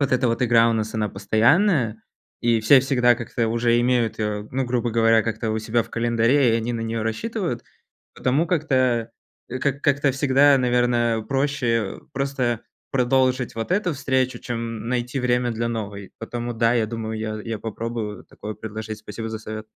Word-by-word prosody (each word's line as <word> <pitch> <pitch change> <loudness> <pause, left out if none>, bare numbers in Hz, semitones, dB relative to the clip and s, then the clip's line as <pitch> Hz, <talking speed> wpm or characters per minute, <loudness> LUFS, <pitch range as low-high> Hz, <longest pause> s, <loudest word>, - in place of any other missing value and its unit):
вот 140 -1 +1
эта 130 0 +3
вот 115 +1 0
игра 115 -1 +5
у - - +2
нас, 110 0 -2
она 105 -1 0
постоянная, 115 - +2 0.4
и 115 -1 +2
все 125 +6 +7
всегда 125 -2 +3
как-то 115 -1 -2
уже 115 +1 +2
имеют, 120 -2 +1
а, 105 -1 -2
ну, 130 +1 0
грубо 120 -1 -1
говоря, 115 0 +4
как-то 115 0 -2
у 110 - -1
себя 110 +2 0
в 115 - -16
календаре, 120 +3 +2
и - - +3
они 115 +1 -2
на 115 - -3
неё 115 0 -2
рассчитывают, 165 - -3 0.5
потому 140 +6 +1
как-то, 130 -8 +1 0.4
а, 130 - -3
к 140 +1 -1
как-то 140 -2 +2
всегда, 135 +1 +4
наверное, 120 -2 +2
проще 130 -5 -1
просто 135 -4 -1 0.3
продолжить 130 -1 +1
вот 115 +5 -4
эту 185 -2 +1
встречу, 130 -2 0
чем 115 -2 -5
найти 125 +2 -1
время 125 0 +1
для 115 0 -2
новой, 100 -4 -5
потому, 120 +1 -4
да, 115 +1 +2
я 115 -2 +2
думаю, 110 -1 -4
я 110 0 -3
я 115 -1 -4
попробую 110 -1 -5
такое 105 0 -8
предложить. 110 0 -6
Спасибо 110 +1 -6
за 110 0 -5
совет. 110 0 -7
120 Hz, 175 wpm, -23 LUFS, 110-130 Hz, 0.5 s, все